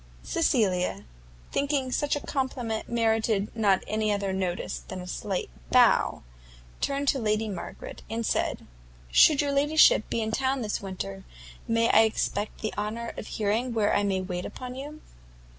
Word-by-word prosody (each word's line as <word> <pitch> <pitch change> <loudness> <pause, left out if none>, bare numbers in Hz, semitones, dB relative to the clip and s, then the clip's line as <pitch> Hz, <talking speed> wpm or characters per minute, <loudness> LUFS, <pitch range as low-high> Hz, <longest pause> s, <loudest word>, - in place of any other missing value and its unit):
Cecilia, 210 - +1 0.5
thinking 280 -2 0
such 290 +3 +1
a - - -2
compliment 245 -5 -2
merited 225 -3 +1
not 200 -4 +3
any 215 0 0
other 200 -2 -1
notice 185 -2 -2
than 185 - -6
a 180 - -7
slight 185 - -3 0.2
bow, - - +4 0.6
turned 280 0 -1
to 270 - +1
Lady 215 -1 0
Margaret, 195 -4 -7
and 230 +1 -2
said, - - -1 0.5
"Should 295 - +6
your 285 - 0
ladyship 290 -4 +4
be 230 - 0
in 220 - -2
town 265 +2 0
this 210 - -2
winter, 100 - -6 0.4
may 230 0 +2
I 220 - +7
expect 215 -1 -1
the 215 - -2
honour 220 +3 -3
of - - -7
hearing 225 +4 -1
where 210 -2 +2
I - - +3
may 195 -2 0
wait 180 -1 -4
upon 250 -1 -7
you?" 290 +4 -8
220 Hz, 160 wpm, -27 LUFS, 200-260 Hz, 0.6 s, I